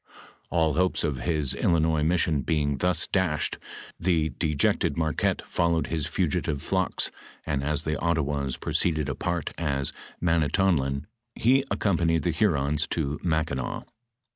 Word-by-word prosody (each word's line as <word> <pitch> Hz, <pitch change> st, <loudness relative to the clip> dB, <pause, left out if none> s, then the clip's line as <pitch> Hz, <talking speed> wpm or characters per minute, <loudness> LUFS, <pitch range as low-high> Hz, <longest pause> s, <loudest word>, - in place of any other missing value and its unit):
All 80 Hz, -3 st, +2 dB
hopes 90 Hz, +3 st, +1 dB
of 75 Hz, -5 st, -1 dB
his 75 Hz, -1 st, +1 dB
Illinois 80 Hz, -2 st, +2 dB
mission 80 Hz, -2 st, +2 dB
being 75 Hz, 0 st, 0 dB
thus 90 Hz, +1 st, +2 dB
dashed, 90 Hz, -6 st, 0 dB, 0.4 s
the 80 Hz, -3 st, +2 dB
dejected 75 Hz, 0 st, 0 dB
Marquette 80 Hz, -3 st, 0 dB
followed 85 Hz, -3 st, +1 dB
his 80 Hz, -3 st, -1 dB
fugitive 70 Hz, -2 st, -1 dB
flocks, 95 Hz, -1 st, 0 dB, 0.3 s
and 70 Hz, -2 st, -1 dB
as 75 Hz, +1 st, -1 dB
the 75 Hz, -1 st, -2 dB
Ottawas 75 Hz, -5 st, 0 dB
proceeded 80 Hz, -4 st, 0 dB
apart 85 Hz, +3 st, -2 dB
to 70 Hz, -4 st, 0 dB, 0.3 s
Manitonlin, 80 Hz, -4 st, +1 dB, 0.3 s
he 125 Hz, +4 st, +4 dB
ac 135 Hz, 0 st, -3 dB
companied 85 Hz, -5 st, +1 dB
the 85 Hz, -, +1 dB
Hurons 75 Hz, -4 st, +1 dB
to 75 Hz, -2 st, -2 dB
Mackinaw. 80 Hz, -6 st, -1 dB
80 Hz, 130 wpm, -26 LUFS, 70-85 Hz, 0.4 s, he